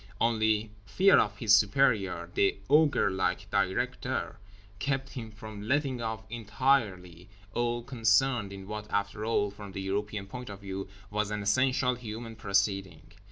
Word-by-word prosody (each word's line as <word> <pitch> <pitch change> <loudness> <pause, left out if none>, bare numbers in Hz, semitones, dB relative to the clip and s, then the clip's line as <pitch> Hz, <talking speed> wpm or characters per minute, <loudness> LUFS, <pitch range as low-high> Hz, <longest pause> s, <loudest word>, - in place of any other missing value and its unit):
Only 110 -2 +2
fear 190 - +5
of 105 0 0
his 110 -3 +3
superior, 100 -5 +2
the 100 -1 +2
ogre 150 -8 +4
like 95 0 -1
Directeur, 95 -1 -1 0.4
kept 135 -1 -1
him 120 -5 -6
from 110 -1 -9
letting 135 -2 0
off 110 -1 -3
entirely 105 -6 0 0.2
all 120 0 -1
concerned 115 -2 +2
in 95 -1 -8
what 105 0 -6
after 100 +1 -1
all 105 -2 +1
(from 100 -1 -10
the 95 - -4
European 100 +1 -2
point 125 +4 -8
of 100 -1 -9
view) 95 0 -5 0.2
was 105 0 0
an 105 -1 -3
essentially 125 +3 +2
human 115 0 -7
proceeding. 100 -5 -1
105 Hz, 145 wpm, -29 LUFS, 100-120 Hz, 0.4 s, fear